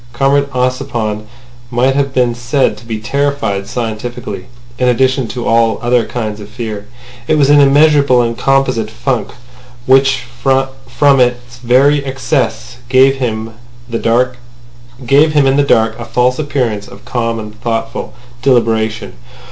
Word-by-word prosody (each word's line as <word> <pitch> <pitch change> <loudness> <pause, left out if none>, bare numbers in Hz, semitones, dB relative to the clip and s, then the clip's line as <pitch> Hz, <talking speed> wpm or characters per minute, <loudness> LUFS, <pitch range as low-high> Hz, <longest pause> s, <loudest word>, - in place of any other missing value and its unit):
Comrade 140 +3 +1
Ossipon 125 -5 -2 0.4
might 125 +2 +1
have 140 -1 0
been 125 -2 +1
said 120 +3 0
to 120 - -15
be 110 -2 -4
terrified 140 -5 -1
scientifically 115 -3 -5 0.3
in 125 - +2
addition 130 0 +1
to 120 +1 -5
all 115 -1 +2
other 120 -1 +1
kinds 110 -3 -4
of 105 0 -10
fear. 110 -3 -6 0.4
It 155 - +2
was 145 -1 +4
an 145 - +6
immeasurable 140 -2 +4
and 115 0 -2
composite 130 -5 +1
funk, 125 +2 -2 0.6
which 135 0 +3 0.2
from 135 0 +1
its 120 -1 0
very 135 +4 +3
excess 130 -4 -2
gave 135 +1 +4
him 115 -3 -3 0.4
in 115 - -1
the 125 +4 0
dark 110 -1 +2
a 120 - -6
false 125 +3 +1
appearance 125 -8 -2
of 125 - -14
calm 115 -2 -2
and 110 0 -9
thoughtful 115 0 -3 0.3
deliberation. 110 -5 +1
125 Hz, 130 wpm, -14 LUFS, 115-135 Hz, 0.6 s, an